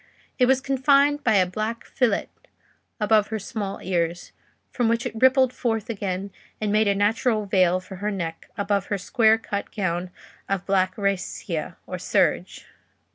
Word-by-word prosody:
It 250 - +5
was 265 0 +3
confined 280 +2 +3
by 220 -3 +3
a 185 -2 +5
black 215 +5 -4
fillet 240 -6 0 0.7
above 210 -1 +3
her 220 - -3
small 200 -1 -5
ears, 175 -1 -2 0.4
from 240 -3 +1
which 230 +1 0
it 245 - -3
rippled 260 +2 +4
forward 225 -1 -2
again, 195 -2 -4 0.3
and 215 -1 -1
made 215 0 +3
a 200 - +2
natural 215 +2 +1
veil 185 -2 +3
for 185 +1 -10
her 205 +3 -2
neck 175 -5 -5
above 200 -1 0
her 205 - -1
square 220 +3 +3
cut 205 -2 -4
gown 180 -2 -2 0.4
of 195 -2 -1
black 185 -1 +1
rascia, 200 -2 -2
or - - -6
serge. - - 0
210 Hz, 160 wpm, -24 LUFS, 195-230 Hz, 0.7 s, It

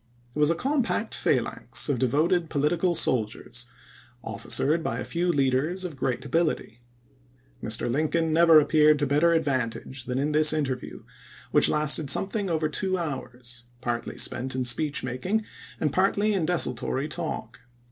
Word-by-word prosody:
It - - -3
was 150 0 +4
a 165 - +2
compact 265 - -1
phalanx - - 0
of 140 -5 0
devoted 160 +6 +1
political 165 +4 +1
soldiers, 120 -1 -1 0.6
officered 155 +4 0
by - - -2
a - - -4
few 175 +1 0
leaders 145 +6 0
of 165 -5 -6
gi'eat 130 +1 -2
ability. 155 -5 -1 0.8
Mr. 110 +1 -1
Lincoln 155 +5 0
never 165 -1 +7
ap 150 - -1
peared 155 -1 +5
to 145 - 0
better 150 +5 +3
advantage 130 -4 -2
than 125 0 -3
in 145 +3 0
this 155 +1 +4
interview, 135 -5 -3 0.5
which - - +5
lasted 150 -1 +2
something 195 +6 +1
over 160 -2 0
two 185 +5 -1
hours, 125 -6 -6
partly 120 -2 -4
spent 130 +1 -2
in 130 -1 -1
speech 145 +5 -1
making 180 - -2 0.3
and 150 -3 -1
partly 200 +4 +2
in 180 -6 0
desultory 135 -4 0
talk. 150 -8 -5
150 Hz, 150 wpm, -26 LUFS, 130-170 Hz, 0.8 s, never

